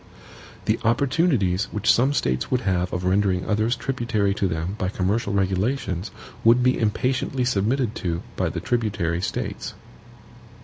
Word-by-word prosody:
The - - +1
opportunities 115 - +2
which 105 - +2
some 130 +4 +3
States 65 - 0
would 130 -1 +1
have 90 -4 0
of 90 - -3
rendering 95 0 +1
others 110 +3 +1
tributary 115 -7 0
to 100 -1 0
them 80 +2 -2
by 95 - 0
commercial 100 +3 -1
regulations 95 0 0 0.3
would 120 +2 +5
be 125 0 +3
impatiently 125 +3 0
submitted 120 +1 +1
to 85 -2 -2
by - - 0
the - - -4
tributary 100 -8 -1
States. - - -4
105 Hz, 140 wpm, -24 LUFS, 95-125 Hz, 0.3 s, would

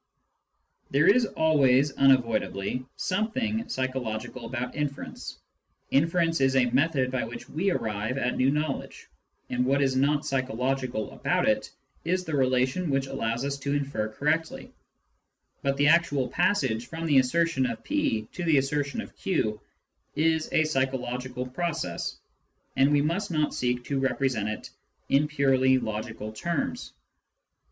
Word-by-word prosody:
There 140 +3 +3
is 225 +3 +5
always 145 -5 +3
unavoidably 125 -4 +2
something 220 +3 -1
psycho 130 0 -1
logical 115 +1 -5
about 125 +1 -4
inference: 145 -2 -5 0.5
inference 165 +1 +2
is 135 0 +3
a 130 -1 +5
method 135 -1 +2
by 130 -1 -1
which 120 +1 -8
we 175 +9 0
arrive 110 - -2
at 125 - 0
new 130 +1 +3
knowledge, 150 0 -3 0.4
and 125 0 +1
what 135 +2 +2
is 135 -2 +2
not 145 +3 +2
psychological 130 -3 -1
about - - 0
it - - +1 0.3
is 180 +3 0
the 160 - -2
relation 130 +6 +1
which 135 -1 +1
allows 120 -2 -2
us 140 0 -3
to 140 +1 -1
infer 135 -7 -1
correctly; 155 +8 -2 0.9
but 140 0 0
the 145 +1 +4
actual 155 -6 +3
passage 165 - +1
from 165 +4 -5
the 145 -4 +5
assertion 150 +1 +2
of 115 -2 -5
p 110 -1 0
to 175 - -5
the 160 -4 +4
assertion 140 +7 0
of - - -11
q 110 - -1 0.5
is 160 0 +1
a 155 - +4
psychological 130 -3 -2
process, 150 - -3 0.6
and 135 +2 +4
we 145 -1 +3
must 180 +7 -1
not 155 -3 0
seek 125 0 -1
to 140 +1 -2
represent 130 -5 0
it 110 - -6 0.4
in 140 +2 +3
purely 135 -3 +3
logical 110 -1 -4
terms. 240 - -3
135 Hz, 145 wpm, -27 LUFS, 125-155 Hz, 0.9 s, is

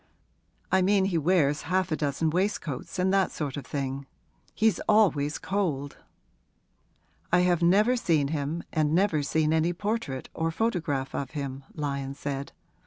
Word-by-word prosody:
'I 190 - +4
mean 195 +1 +3
he 185 -3 0
wears 155 -3 +2
half 185 -2 +1
a - - +2
dozen 150 +1 0
waistcoats, 180 -5 -2
and 185 +1 +2
that 195 -1 +3
sort 145 -4 -4
of 145 - -7
thing. 135 -1 -3 0.5
He's 220 -1 +2
always 160 -9 +3
cold.' 155 -9 -2 1.3
'I 180 +1 +5
have 175 -1 +2
never 205 +8 +4
seen 160 - +1
him 155 +2 -2
and 155 -1 +2
never 180 -5 +2
seen 155 +2 +1
any 160 +2 +2
portrait 200 - -3
or 165 0 -1
photograph 165 -9 -1
of 135 - -3
him,' 135 -1 -5
Lyon 140 -2 -3
said. 140 -1 -4
160 Hz, 150 wpm, -27 LUFS, 140-185 Hz, 1.3 s, I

